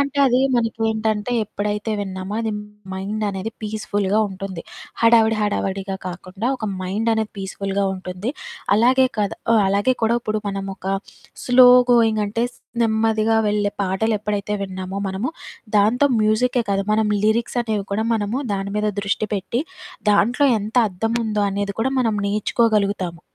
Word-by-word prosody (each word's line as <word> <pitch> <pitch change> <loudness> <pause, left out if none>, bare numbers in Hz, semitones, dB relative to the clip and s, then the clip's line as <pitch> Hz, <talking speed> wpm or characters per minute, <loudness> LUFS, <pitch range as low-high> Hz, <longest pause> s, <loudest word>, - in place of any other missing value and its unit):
అంటే, 280 0 -1
అదీ 250 -1 +3 0.2
మనకేంటంటే, 220 -1 0
ఎప్పుడైతే 210 +1 -3
విన్నామో 190 0 -5
అది 225 -1 -1 0.4
మైండనేది 200 +1 -3
పీస్‌ఫుల్‌గా 210 -1 -1
ఉంటుంది. 190 -2 -6 0.4
హడావుడి 225 -1 +5
హడావడిగా 195 -2 -1
కాకుండా 185 +4 -5
ఒక 225 - -6 0.2
మైండనేది 220 +3 0
పీస్‌ఫుల్‌గా 195 0 -2
ఉంటుంది. 185 +4 -5 0.4
అలాగే 255 +4 +4
కథ్ 205 -2 0 0.2
ఆహ్, 220 - +5
అలాగే 205 +6 +2
కూడా 225 +1 +3
ఇప్పుడు 215 -1 -2
మనమొక 195 -1 -5 0.6
స్లో 250 0 +7 0.2
గోయింగంటే, 225 -1 +2
స్ - - -21 0.3
నెమ్మదిగా 220 0 +2
వెళ్ళే 205 -1 0
పాటలెప్పుడైతే 210 +1 -1
విన్నామో 190 0 -5
మనము, 195 +9 -2 0.5
దాంతో 225 +8 +4
మ్యూజిక్కే 235 +3 +2
కాదు, 195 0 +1
మనం 215 0 +2 0.2
లిరిక్సనేవి 220 -1 0
కూడా 215 +2 0
మనము 220 +3 -1
దాని 195 0 -3
మీద 210 0 0
దృష్టి 200 +2 -1
పెట్టి, 230 +6 -2 0.5
దాంట్లో 240 +7 +3
ఎంతర్ధముందో 220 0 0
అనేది 200 0 -2
కూడా 265 +4 +1
మనం 225 -3 +1
నేర్చుకోగలుగుతాము. 200 -4 0
210 Hz, 125 wpm, -21 LUFS, 195-225 Hz, 0.6 s, స్లో